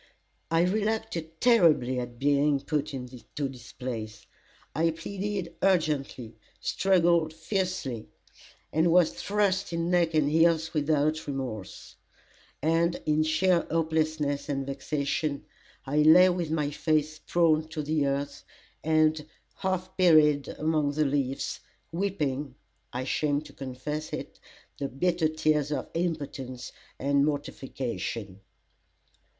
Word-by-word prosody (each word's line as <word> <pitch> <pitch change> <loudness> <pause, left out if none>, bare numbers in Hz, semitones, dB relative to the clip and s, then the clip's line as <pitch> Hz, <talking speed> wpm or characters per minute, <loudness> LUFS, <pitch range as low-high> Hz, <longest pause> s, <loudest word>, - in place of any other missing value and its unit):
I 165 +1 +3
relucted 215 -4 -1
terribly 160 - +4
at 120 -1 -6
being 145 +1 +2
put 150 +1 -2
into 125 -3 -8 0.2
this 125 -3 -11
place. 115 -4 -6 0.5
I 165 +2 +2
pleaded 190 +2 -4
urgently, 150 - 0 0.3
struggled 170 -4 +2
fiercely, 160 - -3 0.7
and 160 +2 +3
was 175 -1 +4
thrust 200 -3 0
in 170 +1 -1
neck 170 -2 +2
and 150 -2 +3
heels 160 +1 +3
without 155 +1 +1
remorse; 125 -9 -6 0.7
and, 165 +2 +2
in 155 0 +2
sheer 170 +3 +2
hopelessness 155 -3 0
and 135 -1 -1
vexation, 140 +1 -2 0.4
I 140 +2 -2
lay 160 +5 +7
with 175 -3 -1
my 150 -2 0
face 155 0 0
prone 160 -2 +2
to 155 -1 -4
the 150 -1 +1
earth, 140 +1 -3 0.4
and 155 -1 +3 0.3
half 185 0 -2
buried 155 -6 +5
among 155 -2 0
the 155 +1 +1
leaves, 135 -1 -1 0.3
weeping, 150 -7 -2 0.4
I 125 +1 -3
shame 145 +2 0
to 145 -2 -14
confess 140 +4 -5
it, - - -6 0.4
the 140 - -1
bitter 165 +4 +1
tears 155 -2 +1
of 135 -3 -3
impotence 140 -7 -4 0.3
and 140 +1 +2
mortification. 120 -8 -4
155 Hz, 115 wpm, -28 LUFS, 140-165 Hz, 0.7 s, lay